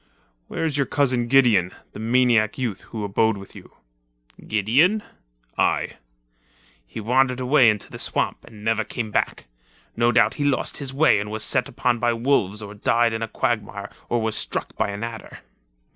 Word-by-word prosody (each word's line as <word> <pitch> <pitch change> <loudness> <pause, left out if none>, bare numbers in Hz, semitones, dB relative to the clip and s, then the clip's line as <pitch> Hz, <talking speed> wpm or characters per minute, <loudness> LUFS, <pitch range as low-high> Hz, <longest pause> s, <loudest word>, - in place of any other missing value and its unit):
"Where - - -3
is 150 -3 -1
your 140 - +1
cousin 125 -4 +1
Gideon, 120 -8 +4 0.2
the - - -9
maniac 115 -2 +2
youth 120 -7 -3
who 110 -2 -5
abode 105 +2 +1
with 100 0 -11
you?" - - -14 0.7
"Gideon?" 135 - +2 0.6
"Aye." - - 0 0.9
"He - - -8
wandered 125 +3 +1
away 130 -1 +5
into 105 -1 -2
the - - -8
swamp - - -1
and 110 -3 -14
never 110 0 +1
came 110 0 -5
back. - - -1 0.5
No 120 +1 +3
doubt 115 -2 +3
he - - +2
lost 145 -2 +1
his 140 -2 -4
way 140 -5 +4
and 105 +1 -4
was 110 0 -2
set 125 +1 +2
upon 120 -2 0
by 120 0 +1
wolves 115 -4 0
or 100 -1 -8
died 115 +2 +1
in 110 - -3
a 115 - -2
quagmire 105 -4 -3 0.2
or 120 - +1
was 110 -1 -1
struck - - -3
by - - -1
an 100 +2 -5
adder." 115 -1 -8
115 Hz, 175 wpm, -23 LUFS, 105-130 Hz, 0.9 s, away